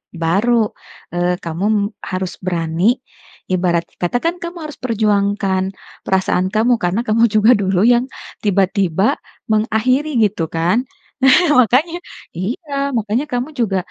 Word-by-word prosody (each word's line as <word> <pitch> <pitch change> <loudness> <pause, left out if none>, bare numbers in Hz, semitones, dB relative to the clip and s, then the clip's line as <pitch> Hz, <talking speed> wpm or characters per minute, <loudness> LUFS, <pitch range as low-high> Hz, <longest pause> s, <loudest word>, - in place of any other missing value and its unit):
baru, 205 +7 +1 0.4
eee, 175 +1 0
kamu 200 +5 0 0.2
harus 185 -1 -2
berani, 170 -2 -2 0.7
ibarat 175 -2 +1 0.2
kata 175 +7 0
kan 335 +2 0
kamu 340 +1 -7
harus 300 -2 -8
perjuangkan 205 -4 +1 0.4
perasaan 190 -1 +1
kamu 230 +3 +3
karena 180 +6 +1
kamu 230 +2 +4
juga 215 +2 +6
dulu 195 -4 +2
yang 240 +2 +4 0.4
tiba-tiba 195 -2 +1 0.3
mengakhiri 250 +7 +1
gitu 195 -6 0
kan? 175 +7 +2 0.4
Nah 265 +3 +6 0.2
makanya 310 - +1 0.4
iya, 280 - -4 0.2
makanya 225 +5 -1
kamu 245 +4 -2
juga, 205 -5 +1
205 Hz, 120 wpm, -18 LUFS, 185-245 Hz, 0.7 s, juga